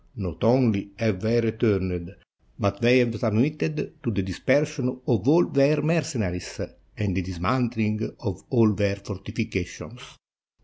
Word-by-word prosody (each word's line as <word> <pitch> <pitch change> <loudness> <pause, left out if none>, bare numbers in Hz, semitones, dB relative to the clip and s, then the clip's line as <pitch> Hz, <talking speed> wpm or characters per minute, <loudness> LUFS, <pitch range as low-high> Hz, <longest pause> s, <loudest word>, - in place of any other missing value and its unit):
"Not 90 -5 -5
only 115 -4 +3
have 110 -5 0
they 115 +2 +2
returned, 100 -6 0 0.4
but 100 +1 -1
they 120 +2 +6
have 115 -3 +2
sub 110 -3 0
mitted 150 +5 -1
to 125 - -2
the 100 -3 -1
dispersion 130 - 0 0.2
of 120 +1 +1
all 165 +4 +6
their 140 +2 +3
mercenaries 130 - -1 0.4
and 100 -4 -1
the 95 - +1
dismantHng 110 +4 -1
of 100 - -4
all 115 -4 +4
their 100 -1 0
fortifications. 100 -1 -6
110 Hz, 135 wpm, -25 LUFS, 100-125 Hz, 0.4 s, they